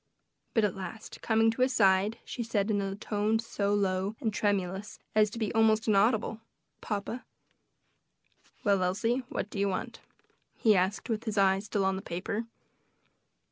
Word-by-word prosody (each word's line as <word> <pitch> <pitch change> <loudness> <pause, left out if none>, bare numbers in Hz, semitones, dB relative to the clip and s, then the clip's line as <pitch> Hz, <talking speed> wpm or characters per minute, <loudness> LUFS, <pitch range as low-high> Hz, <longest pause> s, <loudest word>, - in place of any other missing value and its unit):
But 225 - +4
at 205 -3 +2
last, 195 +3 -8
coming 225 0 +3
to 230 - -4
his 255 +1 +3
side, 195 +1 +3
she 245 - -5
said, 220 -2 0
in 205 -1 +1
a 195 0 -3
tone 210 +1 0
so 215 -3 -2
low 195 +1 0
and 225 -6 -1
tremulous 200 -1 -1 0.2
as 215 -1 +4
to 220 - -8
be 220 -3 -2
almost 220 0 +3
inaudible, 220 +1 +2 0.4
"Papa." 215 +3 -4 1.4
"Well, 200 -4 +3
Elsie, 225 +8 +1
what 205 - -4
do 200 - -4
you 200 0 +2
want?" 185 - -4 0.6
he 215 -2 +4
asked, 190 +3 0
with 225 -1 -2
his 215 -2 -3
eyes 195 0 +3
still 205 -2 0
on 190 0 +1
the - - -5
paper. 195 +5 -3
210 Hz, 165 wpm, -30 LUFS, 195-225 Hz, 1.4 s, But